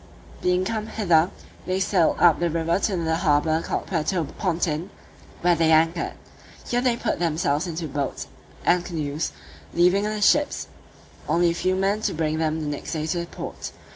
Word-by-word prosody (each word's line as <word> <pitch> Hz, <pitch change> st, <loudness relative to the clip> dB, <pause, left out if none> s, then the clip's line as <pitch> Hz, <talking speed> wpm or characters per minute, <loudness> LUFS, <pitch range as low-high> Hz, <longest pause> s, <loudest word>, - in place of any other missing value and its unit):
Being 180 Hz, +1 st, +2 dB
come 220 Hz, 0 st, -2 dB
hither, 175 Hz, -6 st, +3 dB, 0.4 s
they 185 Hz, +1 st, 0 dB
sailed 185 Hz, -3 st, +2 dB
up 170 Hz, -3 st, +5 dB
the 170 Hz, 0 st, +1 dB
river 165 Hz, +2 st, 0 dB
to 200 Hz, -, 0 dB
another 165 Hz, -3 st, 0 dB
harbour 155 Hz, -1 st, +2 dB
called -, -, -3 dB
Puerto 170 Hz, 0 st, 0 dB
Pontin, 165 Hz, 0 st, -2 dB, 0.5 s
where 175 Hz, 0 st, +4 dB
they 165 Hz, -1 st, +3 dB
anchored: 165 Hz, +2 st, +2 dB, 0.5 s
here 245 Hz, 0 st, +1 dB
they 245 Hz, -2 st, +2 dB
put -, -, -1 dB
themselves 160 Hz, -1 st, 0 dB
into 165 Hz, -1 st, -4 dB
boats 140 Hz, -1 st, -3 dB, 0.4 s
and 175 Hz, 0 st, +3 dB
canoes, 155 Hz, -3 st, -3 dB, 0.4 s
leaving 180 Hz, +4 st, +4 dB
in 210 Hz, -, -1 dB
the 215 Hz, -, -3 dB
ships 290 Hz, +8 st, +3 dB, 0.6 s
only 170 Hz, 0 st, +3 dB
a -, -, -1 dB
few 185 Hz, +2 st, 0 dB
men 195 Hz, +3 st, +1 dB
to -, -, -1 dB
bring 155 Hz, 0 st, -1 dB
them 155 Hz, -1 st, -1 dB
next 145 Hz, -, -5 dB
day 155 Hz, -1 st, -2 dB
to 165 Hz, +2 st, -1 dB
the 170 Hz, -, -4 dB
port. -, -, -7 dB
170 Hz, 175 wpm, -24 LUFS, 160-185 Hz, 0.6 s, up